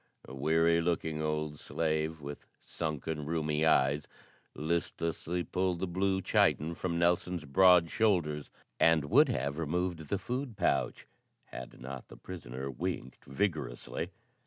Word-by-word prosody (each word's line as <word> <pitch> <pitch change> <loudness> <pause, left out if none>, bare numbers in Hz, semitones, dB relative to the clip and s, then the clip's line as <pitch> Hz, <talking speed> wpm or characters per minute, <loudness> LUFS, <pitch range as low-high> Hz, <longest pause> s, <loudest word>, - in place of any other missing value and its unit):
A - - -9
weary 80 +4 +3
looking 80 -2 -1
old 75 -1 -2
slave 80 -1 -1
with 70 +1 -8
sunken, 75 -1 -4
rheumy 80 -1 +1
eyes 70 0 +3 0.5
listlessly 85 +2 -1
pulled 90 0 0
the 95 - 0
blue 95 +1 0
chiton 80 +3 +3
from 85 0 -2
Nelson's 85 -1 +1
broad 85 +3 +6
shoulders, 85 -9 +1 0.3
and 80 -3 +4
would - - +6
have 70 +4 -1
removed 85 0 -2
the 100 - +1
food 125 +3 -4
pouch - - 0 0.4
had 60 -1 -9
not 65 +1 -7
the - - -13
prisoner 70 -7 -7
winked 70 -2 -4
vigorously. 70 -5 -2
80 Hz, 130 wpm, -31 LUFS, 75-90 Hz, 0.5 s, broad